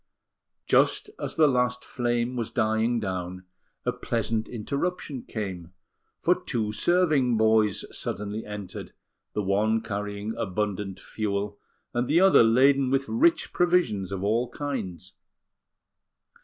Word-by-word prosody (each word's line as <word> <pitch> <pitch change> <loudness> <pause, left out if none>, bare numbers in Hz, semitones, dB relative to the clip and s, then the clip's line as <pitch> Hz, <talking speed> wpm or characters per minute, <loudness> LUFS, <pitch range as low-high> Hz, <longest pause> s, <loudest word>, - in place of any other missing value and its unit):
Just 415 - +3
as - - -4
the 160 - +5
last 125 -3 +1
flame 120 0 -1
was 115 -3 -2
dying 115 0 +1
down, 95 -2 -4 0.4
a - - +2
pleasant 115 -1 -2
interruption 140 +4 -3
came; 95 -7 -6 0.5
for - - +4
two 110 -3 -3
serving 145 -2 +2
boys 110 -2 +3
suddenly 105 +3 -4
entered, 105 -2 -7 0.4
the 105 - -1
one 105 +3 +2
carrying 105 +1 -4
abundant 100 -2 -2
fuel, 100 -1 -3 0.3
and 120 +1 0
the 160 +4 +4
other 190 +1 +7
laden 130 +4 +4
with 135 +1 +1
rich 330 +9 +2
provisions 170 - +2
of 95 -1 -3
all 115 +4 +1
kinds. 135 - -5
110 Hz, 120 wpm, -26 LUFS, 100-130 Hz, 0.5 s, other